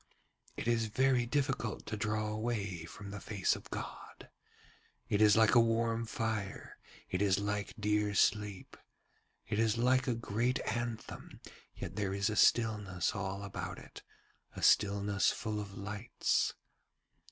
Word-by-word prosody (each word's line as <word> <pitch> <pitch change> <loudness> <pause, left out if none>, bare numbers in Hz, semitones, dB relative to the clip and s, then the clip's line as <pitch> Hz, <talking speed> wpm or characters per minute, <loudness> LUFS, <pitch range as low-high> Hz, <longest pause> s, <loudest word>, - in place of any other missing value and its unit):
'It - - -4
is 115 -2 +2
very 125 +2 +2
difficult 135 -4 -1
to 110 - -4
draw 105 0 -1
away 105 -6 -3
from 100 +4 -9
the 100 - -6
face 100 -3 0
of - - -11
God - - -8 0.8
it 105 - +1
is 105 0 +6
like 110 -1 +5
a 120 - +8
warm 115 0 +1
fire, 110 -3 -4 0.3
it 95 - 0
is 100 -2 +3
like 105 +1 -2
dear 105 0 +1
sleep, 105 -1 +1 0.7
it 110 -1 -2
is 115 0 +2
like 130 +2 +3
a 125 - +1
great 115 +2 0
anthem, 120 0 -4 0.4
yet 90 - -7
there 100 -2 -1
is 100 +2 +1
a - - -2
stillness 105 -6 +2
all 100 0 -4
about 100 - -5
it, - - -12 0.5
a - - -6
stillness 100 0 +4
full 110 -1 -3
of 100 -1 -9
lights. 105 +3 -1
105 Hz, 145 wpm, -33 LUFS, 100-115 Hz, 0.8 s, a